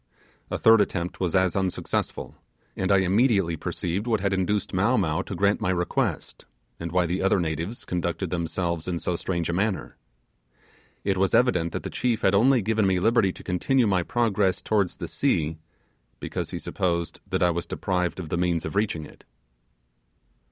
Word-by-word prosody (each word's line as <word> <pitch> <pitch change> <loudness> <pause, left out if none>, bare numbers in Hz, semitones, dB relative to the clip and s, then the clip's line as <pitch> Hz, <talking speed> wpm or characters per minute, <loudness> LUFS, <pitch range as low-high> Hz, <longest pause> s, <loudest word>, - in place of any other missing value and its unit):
A - - -2
third 115 -1 +6
attempt 90 -3 -2
was 90 -2 0
as 95 -2 +2
unsuccessful, 95 -2 -2 0.4
and 95 0 -1
I 100 -1 +5
immediately 95 -3 +2
perceived 90 +6 -3
what 110 -3 +2
had 100 0 0
induced 95 +3 -1
Mow 100 +7 +2
Mow 80 0 +1
to 100 - -6
grant 100 +3 +2
my - - 0
request, 90 -1 -1 0.3
and 85 -1 -5
why 90 0 +2
the 90 +3 -1
other 95 0 +3
natives 85 +6 -3
conducted 85 0 -2
themselves 85 -1 -2
in 90 -2 -1
so 85 +1 -2
strange 85 -2 -2
a 85 - -1
manner. 100 +2 -1 1.1
It 100 -1 0
was 95 0 +2
evident 90 -10 +2
that - - -4
the - - -5
chief 120 -3 0
had 95 - +4
only 120 +3 +4
given 110 -1 +2
me 95 -1 +2
liberty 110 -1 +3
to - - -12
continue 120 +8 +1
my 95 -4 +2
progress 105 -2 +1
towards 100 -5 0
the - - -6
sea, 80 0 0 0.6
because - - -4
he - - -4
supposed 85 -2 -2
that - - +1
I 90 - +4
was 85 0 -3
deprived 90 -1 -1
of 85 -4 -6
the 85 - -1
means 85 -2 0
of - - -5
reaching 100 -7 0
it. - - -16
95 Hz, 180 wpm, -25 LUFS, 85-100 Hz, 1.1 s, third